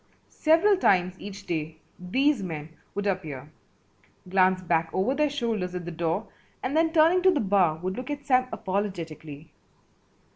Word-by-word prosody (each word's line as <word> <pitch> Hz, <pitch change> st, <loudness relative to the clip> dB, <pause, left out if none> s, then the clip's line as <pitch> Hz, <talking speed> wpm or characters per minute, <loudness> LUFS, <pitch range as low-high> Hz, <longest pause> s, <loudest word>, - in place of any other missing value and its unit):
Several 335 Hz, +6 st, +3 dB
times 185 Hz, -, +3 dB
each 205 Hz, 0 st, -9 dB
day 160 Hz, -1 st, -3 dB, 0.2 s
these 260 Hz, +8 st, +1 dB
men 160 Hz, -4 st, -5 dB, 0.3 s
would 205 Hz, 0 st, -2 dB
appear, 155 Hz, -8 st, -3 dB, 0.8 s
glance 185 Hz, 0 st, +3 dB
back 165 Hz, -2 st, +1 dB
over 195 Hz, +8 st, +1 dB
their 300 Hz, +1 st, +1 dB
shoulders 225 Hz, -10 st, -2 dB
at 180 Hz, -1 st, -5 dB
the 175 Hz, -, -5 dB
door, 170 Hz, +5 st, -1 dB, 0.4 s
and 260 Hz, +3 st, -2 dB
then 325 Hz, 0 st, +3 dB
turning 330 Hz, +3 st, +4 dB
to 375 Hz, -, +5 dB
the 345 Hz, -6 st, +2 dB
bar 190 Hz, -6 st, +2 dB
would 185 Hz, +3 st, -4 dB
look 250 Hz, +2 st, -6 dB
at 290 Hz, -1 st, -5 dB
Sam 255 Hz, -2 st, +3 dB
apologetically. 170 Hz, -7 st, -4 dB
195 Hz, 155 wpm, -26 LUFS, 170-270 Hz, 0.8 s, to